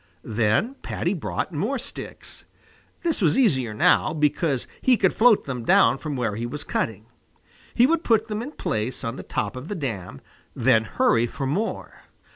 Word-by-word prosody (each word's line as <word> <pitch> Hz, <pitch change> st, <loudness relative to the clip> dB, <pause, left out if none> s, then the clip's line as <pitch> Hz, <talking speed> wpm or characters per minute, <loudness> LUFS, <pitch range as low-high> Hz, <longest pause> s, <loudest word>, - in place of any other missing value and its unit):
Then 110 Hz, -, +1 dB
Paddy -, -, -2 dB
brought -, -, -3 dB
more -, -, -1 dB
sticks. -, -, -8 dB, 0.6 s
This 330 Hz, -8 st, 0 dB
was 175 Hz, -, +3 dB
easier 135 Hz, -, +2 dB
now, 105 Hz, -, +3 dB
because 150 Hz, -2 st, 0 dB, 0.2 s
he 255 Hz, -2 st, +4 dB
could 190 Hz, -3 st, +2 dB
float 225 Hz, -2 st, +4 dB
them 125 Hz, -4 st, -4 dB
down 130 Hz, -, +4 dB
from 150 Hz, -3 st, -4 dB
where 115 Hz, -5 st, -1 dB
he 115 Hz, +2 st, -3 dB
was 145 Hz, +4 st, -6 dB
cutting. 110 Hz, -5 st, -3 dB, 0.7 s
He 240 Hz, -, +6 dB
would 330 Hz, +4 st, +1 dB
put 225 Hz, -1 st, +2 dB
them 215 Hz, -1 st, -3 dB
in 285 Hz, +6 st, -7 dB
place 115 Hz, -, -3 dB
on 115 Hz, 0 st, -3 dB
the -, -, -7 dB
top 105 Hz, -, -3 dB
of 130 Hz, +4 st, -7 dB
the 205 Hz, -, -4 dB
dam, 100 Hz, -, -5 dB, 0.4 s
then 110 Hz, 0 st, +3 dB
hurry 115 Hz, +2 st, +2 dB
for 135 Hz, -, -5 dB
more. 190 Hz, +12 st, -3 dB
140 Hz, 175 wpm, -24 LUFS, -, 0.7 s, He